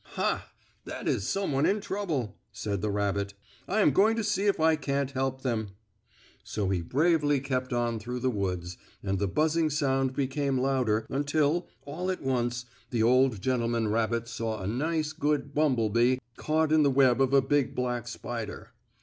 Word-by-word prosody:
"Ha! - - -1 0.3
That - - -6
is 95 - 0
some 195 -3 -1
one 140 +2 +2
in 205 +2 +2
trouble!" 165 - -3
said 100 -1 -3
the 105 - -1
rabbit. 100 0 -1 0.3
"I'm 210 +3 +3
going 220 +3 +4
to 225 - -1
see 205 -1 0
if 200 - +2
I 160 0 +4
can't 140 -2 -1
help 130 -1 -2
them." 110 -6 -2 0.7
So 100 -3 -2
he 95 -3 0
bravely 145 - +2
kept 130 -1 -2
on 120 -2 0
through 125 +3 -5
the 130 0 +1
woods, 90 -4 -3 0.3
and 95 -1 -1
the 100 - +1
buzzing 155 - +1
sound 135 -3 0
became 140 0 0
louder, 125 -5 +1
until, 145 +4 +1 0.2
all 170 +6 -4
at 185 - -3
once, 120 -2 -1 0.2
the 115 -3 +1
old 125 -3 +3
gentleman 115 -3 0
rabbit 115 +1 0
saw 115 -2 -3
a 95 - -5
nice, 155 - -1
good 145 -2 -1
bumble 130 -8 +2
bee 120 +3 +3 0.2
caught 155 0 0
in 155 0 +5
the 145 - +4
web 130 -1 +4
of 135 -1 +3
a 140 0 +6
big, 140 0 +1
black 125 -1 -2
spider. 120 -2 -6
130 Hz, 175 wpm, -28 LUFS, 115-150 Hz, 0.7 s, a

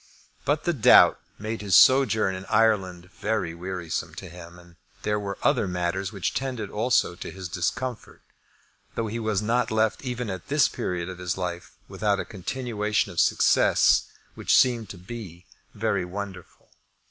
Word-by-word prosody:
But 145 +2 +1
the 175 - +1
doubt 125 -9 +6 0.2
made 110 +1 -5
his 100 -4 +2
sojourn 115 -7 +5
in 95 +1 -7
Ireland 95 -5 +1
very 110 -4 -2
wearisome 85 -2 -5
to 90 +1 -8
him. 85 0 -12
And 85 -1 -17 0.3
there 105 0 0
were 100 -1 -5
other 100 - +2
matters 90 +2 -2
which 100 -4 -2
tended 130 -6 -3
also 110 -4 +1
to 85 - -8
his 95 -1 -7
discomfort, 115 +8 -4 0.7
though 115 - -1
he 110 +2 -4
was 110 -2 -1
not 120 +2 +1
left 110 +2 0
even 125 -4 -3
at 95 0 -7
this 145 0 +3
period 90 -7 -3
of 90 -1 -8
his 90 -1 -3
life 90 -1 -5
without 105 -2 0
a - - -3
continuation 105 0 -2
of - - -4
success - - +4 0.3
which - - +2
seemed 120 -5 +2
to 100 - -8
be 90 -2 -9 0.3
very 105 -3 0
wonderful. 95 +1 -8
100 Hz, 160 wpm, -25 LUFS, 90-115 Hz, 0.7 s, doubt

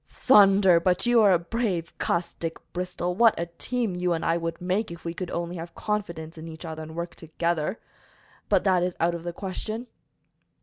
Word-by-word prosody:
"Thunder! 195 -6 +6
but 180 +3 +1
you 240 -1 +5
are 205 -2 +6
a 180 - +6
brave 175 -2 -2
cuss, 170 0 -1
Dick 165 -1 -4 0.2
Bristol! 180 0 -2
What 225 +1 +4
a 170 - 0
team 240 -5 -1
you 180 0 0
and 165 - -2
I 165 - +3
would 165 0 -3
make, 185 +5 -1
if 170 0 -10
we 170 - -2
could 180 0 -5
only 170 +1 -3
have 170 +1 -8
confidence 170 -7 -3
in 160 - -8
each 160 +1 -9
other 160 -1 -6
and 160 0 -8
work 170 0 -4
together! 170 +3 -2 0.7
But, - - +3
that 185 -3 +3
is 180 0 -1
out 170 +1 +2
of 170 - -4
the 175 - -3
question." 215 +6 -5
175 Hz, 205 wpm, -26 LUFS, 170-195 Hz, 0.7 s, Thunder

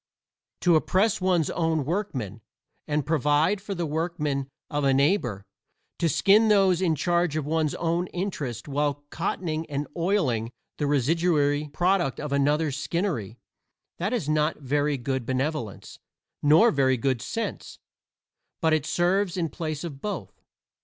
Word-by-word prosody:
To 175 -2 +4
oppress 190 +7 +2
one's 180 -4 +2
own 160 -4 0
workmen, 130 - -3 0.5
and 150 -2 0
provide 155 +5 +2
for 200 -1 -5
the 170 -1 -2
workmen 150 -3 -2 0.2
of 145 0 -2
a 135 -1 +3
neighbor 135 - +1 0.5
to 170 - +2
skin 205 - +4
those 195 -4 +4
in 170 -4 +2
charge 175 +1 +1
of 155 -3 -1
one's 155 0 0
own 170 +1 -1
interests 150 - -4
while 145 0 -1
cottoning 165 -2 -2
and 145 0 -3
oiling 165 - 0 0.3
the 145 - 0
residuary 145 +1 +2
product 175 -5 +1
of 150 -1 -5
another's 145 +1 +1
skinnery 145 - -2 0.6
that 190 +5 -1
is 235 - -1
not 155 +1 +1
very 145 +1 0
good 130 0 -2
benevolence, 130 - -3 0.4
nor 160 +11 +6
very 130 -2 +2
good 130 -1 0
sense, 225 - -4 0.8
but 160 -2 +2
it 155 -2 +1
serves 185 +1 +1
in 165 -2 0
place 155 -2 -4
of 145 -5 -7
both. 185 - -5
155 Hz, 140 wpm, -26 LUFS, 140-175 Hz, 0.8 s, nor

